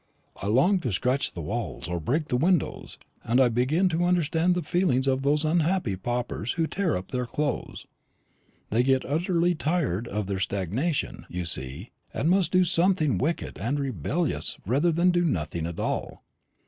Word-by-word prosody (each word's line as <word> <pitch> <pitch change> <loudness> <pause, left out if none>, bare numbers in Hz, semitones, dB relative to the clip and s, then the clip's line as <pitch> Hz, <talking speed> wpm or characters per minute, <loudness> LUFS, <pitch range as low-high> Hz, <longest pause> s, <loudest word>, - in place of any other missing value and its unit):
I 100 - -5
long 140 - +4
to 125 -9 -2
scratch 125 +8 0
the 85 - -6
walls, 110 +3 -4
or 85 0 -2
break 145 - -1
the - - +1
windows; 170 +5 0 0.3
and 120 +3 +2
I 130 -2 +5
begin 130 +11 +2
to 170 +1 +1
understand 175 0 +2
the 180 - -1
feelings 150 -6 +1
of 135 -1 +1
those 145 +3 +2
unhappy 165 - +1
paupers 120 +2 -3
who 165 -2 0
tear 180 - 0
up 90 - -8
their 125 -1 -2
clothes: 145 +1 -3 0.9
they 115 +3 +3
get 130 +1 +2
utterly 170 +4 +1
tired 150 - -1
of 105 -1 -2
their 95 0 -3
stagnation, 100 - -2
you 90 0 -4
see, 70 - -4 0.2
and 160 - +1
must 190 -1 +2
do 185 -1 +4
something 175 -3 +2
wicked 160 +5 -2
and 135 +8 -1
rebellious 140 - -1
rather 140 - +2
than 170 +3 +3
do 175 0 +2
nothing 85 - -1
at 85 - -6
all. - - -3
140 Hz, 175 wpm, -26 LUFS, 110-170 Hz, 0.9 s, I